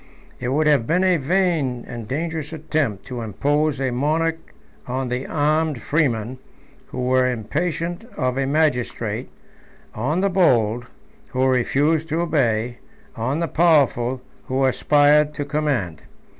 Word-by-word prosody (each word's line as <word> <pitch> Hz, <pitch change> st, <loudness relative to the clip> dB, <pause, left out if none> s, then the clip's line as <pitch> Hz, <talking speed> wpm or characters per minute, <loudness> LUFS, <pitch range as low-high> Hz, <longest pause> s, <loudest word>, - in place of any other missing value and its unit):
It 120 Hz, -, -3 dB
would 145 Hz, +5 st, +1 dB
have 145 Hz, -7 st, +3 dB
been 180 Hz, +3 st, +2 dB
a 185 Hz, -2 st, +4 dB
vain 155 Hz, -6 st, 0 dB
and 120 Hz, -3 st, -7 dB
dangerous 160 Hz, +3 st, -3 dB
attempt 155 Hz, -9 st, -2 dB
to 125 Hz, -2 st, -5 dB
impose 145 Hz, +7 st, 0 dB
a 135 Hz, -2 st, 0 dB
monarch 160 Hz, +5 st, -1 dB, 0.3 s
on 130 Hz, 0 st, -2 dB
the 125 Hz, +2 st, -3 dB
armed 155 Hz, -2 st, 0 dB
freemen, 130 Hz, -5 st, 0 dB, 0.5 s
who 125 Hz, -, -5 dB
were 130 Hz, 0 st, +3 dB
impatient 165 Hz, -, -3 dB
of 125 Hz, -3 st, 0 dB
a 135 Hz, 0 st, 0 dB
magistrate; 125 Hz, -6 st, 0 dB, 0.6 s
on 145 Hz, +11 st, -1 dB
the 200 Hz, -, +2 dB
bold, 120 Hz, -, +2 dB, 0.4 s
who 130 Hz, +1 st, 0 dB
refused 145 Hz, +5 st, +1 dB
to 160 Hz, +2 st, 0 dB
obey; 120 Hz, -7 st, 0 dB, 0.4 s
on 130 Hz, +8 st, -1 dB
the 170 Hz, -, 0 dB
powerful, 135 Hz, -7 st, +2 dB, 0.2 s
who 135 Hz, +1 st, 0 dB
aspired 150 Hz, +3 st, +3 dB
to 145 Hz, -, -3 dB
command. 140 Hz, -, -1 dB
140 Hz, 135 wpm, -22 LUFS, 125-155 Hz, 0.6 s, a